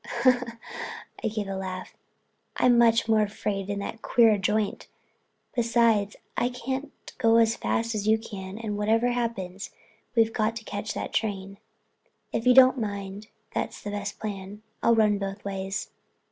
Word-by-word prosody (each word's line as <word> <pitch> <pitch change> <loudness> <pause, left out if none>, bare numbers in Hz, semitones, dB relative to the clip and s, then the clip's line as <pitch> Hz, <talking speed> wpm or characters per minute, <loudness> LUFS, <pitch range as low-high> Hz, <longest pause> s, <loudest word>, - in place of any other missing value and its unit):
I - - +2
gave 210 -2 -3
a 195 - -3
laugh. 185 -1 -5 0.6
"I'm 250 -1 +5
much 230 -1 +4
more 220 -1 +4
afraid 205 -1 -2
in 200 - -1
that 225 +2 -6
queer 230 -3 +5
joint. 210 +2 0 0.7
Besides, 230 -3 +2 0.2
I 245 - +1
can't 260 +3 -4 0.3
go 230 -2 +5
as 225 0 +4
fast 230 0 -1
as 210 -1 -2
you 220 +1 +5
can 200 -3 -7
and 215 -2 -4
whatever 225 +3 +3
happens 215 -6 -3 0.5
we've 225 -1 +4
got 220 +1 0
to 225 - -6
catch 205 0 -4
that - - -4
train." 195 -2 -2 0.7
"If 230 - -1
you 250 - +7
don't 260 0 +8
mind 200 -1 -4 0.3
that's - - -3
the 205 - -4
best 205 0 -4
plan. 205 0 -6 0.2
I'll 235 - +4
run 210 -2 +3
both 195 +1 -5
ways." 195 0 -3
215 Hz, 155 wpm, -27 LUFS, 200-230 Hz, 0.7 s, don't